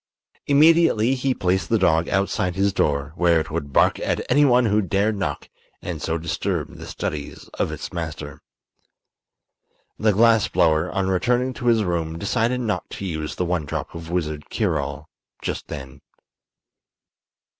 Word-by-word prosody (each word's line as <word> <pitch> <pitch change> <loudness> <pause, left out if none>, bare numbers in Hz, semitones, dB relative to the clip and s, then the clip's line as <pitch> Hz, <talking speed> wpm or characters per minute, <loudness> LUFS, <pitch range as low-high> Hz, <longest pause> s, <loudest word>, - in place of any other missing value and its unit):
Immediately 145 -5 +5
he 130 0 0
placed 95 +1 0
the 115 - +3
dog 80 -4 +2
outside 95 -2 0
his 100 0 +1
door, 75 -3 0
where 85 -2 +3
it 80 0 -5
would 75 -3 -4
bark - - +3
at - - -1
anyone 125 -3 +5
who 105 0 +2
dared 100 +3 0
knock 95 -2 -3 0.3
and 85 -4 -6
so 80 +1 -1
disturb 80 0 -3
the - - -9
studies 75 -2 -5
of - - 0
its - - -7
master. 80 -3 -6 1.6
The 110 0 +3
glass 110 +1 +4
blower, 80 -5 +2
on 95 -1 -1
returning 125 +7 +1
to 120 0 -5
his 115 -2 +4
room, 85 -3 -2
decided 115 +7 0
not 110 -3 -2
to 100 - -5
use 80 -4 -4
the 90 - -1
one 85 -2 -1
drop - - -4
of 85 -1 -8
wizard 75 -4 -3
cure - - 0
all 70 +2 -5 0.4
just - - -4
then. 65 -3 -8
90 Hz, 155 wpm, -23 LUFS, 80-115 Hz, 1.6 s, Immediately